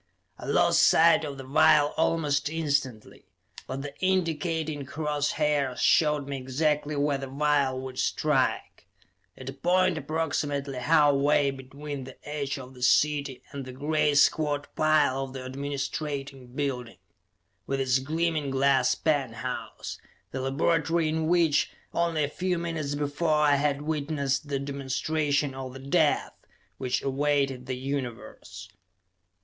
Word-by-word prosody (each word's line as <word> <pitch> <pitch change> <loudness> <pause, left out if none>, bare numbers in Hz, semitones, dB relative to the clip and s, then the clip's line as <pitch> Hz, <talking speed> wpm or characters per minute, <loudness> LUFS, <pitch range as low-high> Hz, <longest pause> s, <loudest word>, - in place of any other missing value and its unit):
I - - -8
lost - - +4
sight 165 0 +5
of 145 -3 -5
the 135 - -7
vial 145 +2 +4
almost 150 -3 +1
instantly, 140 -8 -2 0.4
but 135 +1 -4
the 145 -1 -7
indicating 165 -4 -1
cross 145 +1 -2
hairs 145 -4 0
showed 150 -3 +3
me 140 -1 -3
exactly 145 +3 -1
where 145 -1 +1
the 135 - -5
vial 140 -1 +1
would 130 -1 -7
strike; 145 -4 0 0.5
at 130 - -10
a 135 - -4
point 180 +3 +2
approximately 145 -3 -2
half 145 +2 +4
way 140 0 +3
between 135 +1 -7
the 130 - -11
edge 145 -2 -3
of 130 -1 -10
the 125 - -14
city 140 0 +2
and 140 -1 -6
the 130 - -8
great 150 +2 +1
squat 145 -1 +2
pile 150 -4 +3
of 130 - -11
the 130 -1 -7
administrating 140 0 -4
building, 125 -5 -4 0.7
with 135 0 -1
its 130 -1 +2
gleaming 155 +1 -1
glass 135 -1 +3
penthouse 130 -5 -3 0.3
the 130 - -4
laboratory 160 +4 +1
in 160 0 -1
which, 165 -3 +3 0.2
only 170 -2 +1
a - - +1
few 180 +4 -2
minutes 160 -4 -3
before, 150 +2 0
I 145 -1 +4
had 145 0 0
witnessed 145 -2 -1
the 140 -1 -1
demonstration 140 +1 -1
of 130 -1 -7
the 135 - -9
death 135 +1 +1 0.5
which 130 0 -1
awaited 135 -2 0
the 130 -1 -3
Universe. 125 -8 -6
145 Hz, 140 wpm, -27 LUFS, 135-150 Hz, 0.7 s, sight